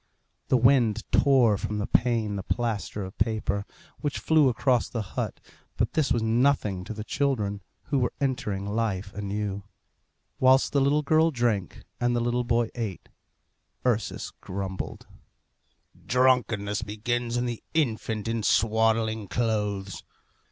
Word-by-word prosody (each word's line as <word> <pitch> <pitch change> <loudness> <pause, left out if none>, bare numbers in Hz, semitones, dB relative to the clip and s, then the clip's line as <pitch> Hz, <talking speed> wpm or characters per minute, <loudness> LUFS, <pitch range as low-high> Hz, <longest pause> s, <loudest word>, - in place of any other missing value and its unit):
The 130 - +4
wind 120 -3 +3
tore 125 -8 +4
from 105 - -3
the 105 - -1
pane 115 -3 +1
the 100 - -3
plaster 105 -2 -2
of 95 - -10
paper, 110 -3 0 0.3
which 145 -1 -2
flew 155 -4 +4
across 125 0 +1
the 115 -3 -3
hut; - - -3 0.4
but - - 0
this 155 -3 +1
was 115 - +2
nothing 110 -5 +2
to 110 - -5
the 105 - -5
children, 110 -7 -1 0.2
who 140 - 0
were 125 - 0
entering 110 -8 -1
life 100 -2 -2
anew. 100 0 -3 0.8
Whilst 130 +2 +4
the 140 - +3
little 145 +2 +2
girl 160 +3 +4
drank, 120 - -1 0.2
and 120 0 +1
the - - +2
little 120 +1 0
boy 120 -1 +1
ate, 110 -7 -5 0.8
Ursus 115 -4 -1
grumbled, 95 0 -5 1.0
"Drunkenness 120 -5 +2
begins 115 +3 -2
in 120 - 0
the 120 -2 -4
infant 110 -7 0
in 115 0 -1
swaddling 110 0 +2
clothes. 105 -4 -2
115 Hz, 135 wpm, -27 LUFS, 105-125 Hz, 1.0 s, The